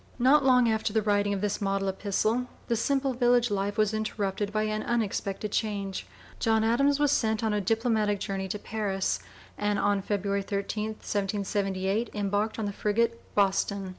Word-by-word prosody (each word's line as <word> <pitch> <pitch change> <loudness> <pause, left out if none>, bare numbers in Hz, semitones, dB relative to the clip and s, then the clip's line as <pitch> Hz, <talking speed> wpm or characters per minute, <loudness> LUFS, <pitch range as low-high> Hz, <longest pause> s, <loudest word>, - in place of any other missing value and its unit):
Not 270 +4 +5
long 250 -2 +5
after 220 -1 0
the 220 0 +1
writing 205 -1 +2
of 200 -1 -1
this 210 0 -1
model 195 0 0
epistle, 215 +5 0 0.2
the 235 - +1
simple 270 +3 +1
village 245 -1 +3
life 200 0 -1
was 215 0 +2
interrupted 205 -2 -2
by 215 0 0
an 215 0 -1
unexpected 210 -3 -2
change. 200 -3 -2 0.3
John 220 -1 +2
Adams 275 +6 +3
was 290 -1 +3
sent 220 -4 +1
on 220 -1 +1
a 210 - +1
diplomatic 220 -1 +1
journey 195 0 -3
to 200 - -3
Paris, 205 -2 -2 0.4
and 205 0 +1
on 200 0 +1
February 200 0 -1
13, 200 +2 -3
1778, 200 0 -1
embarked 205 +1 -1
in 220 - -2
the 200 - -3
frigate 230 +3 0
Boston. 195 -1 +1
210 Hz, 165 wpm, -28 LUFS, 200-225 Hz, 0.4 s, Not